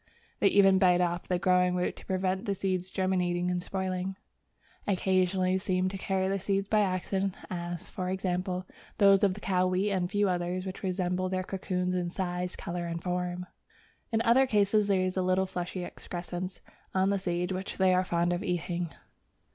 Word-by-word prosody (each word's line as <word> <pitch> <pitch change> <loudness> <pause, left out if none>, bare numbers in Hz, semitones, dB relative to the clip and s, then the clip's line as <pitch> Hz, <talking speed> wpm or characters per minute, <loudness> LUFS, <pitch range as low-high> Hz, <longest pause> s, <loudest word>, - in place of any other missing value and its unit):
They - - +5
even 195 -1 +5
bite 180 -2 +5
off 175 -1 0
the 180 - +1
growing 180 0 +3
root 180 0 -1
to - - -12
prevent 190 +2 0
the 200 -3 0
seeds 185 -1 -1
germinating 180 -2 0
and 180 0 -1
spoiling. 190 0 -3 0.7
Occasionally 185 -1 +2
they 190 - +3
seem 185 -1 0
to 195 - -5
carry 190 0 0
the 195 +1 0
seeds 195 +1 0
by 215 +1 +3
accident, 190 0 0 0.2
as, 175 -1 -4
for 185 0 -4
example, 185 0 -2 0.3
those 200 -1 +6
of 195 -2 +3
the - - -8
cow 185 -2 +1
wheat 185 +3 +1
and 185 -2 +1
a - - -1
few 205 +2 +1
others 180 0 -1
which 190 0 -6
resemble 185 -1 -1
their 185 0 -1
cocoons 180 -1 -2
in 180 -1 -1
size, 180 0 -3
colour, 175 0 -4
and 170 0 -4
form. 180 0 -2 0.7
In 225 0 +2
other 255 +3 +5
cases 210 -1 +3
there 195 -2 +3
is 185 0 -1
a - - +3
little 185 +1 +2
fleshy 180 0 -4
excrescence 175 +2 -6 0.3
on 190 +1 +3
the 200 - +1
seed 180 0 -1
which 190 +1 -4
they 190 -1 +4
are 185 0 +3
fond 175 -1 +1
of 175 +3 -2
eating. 175 -1 -2
185 Hz, 190 wpm, -29 LUFS, 180-190 Hz, 0.7 s, those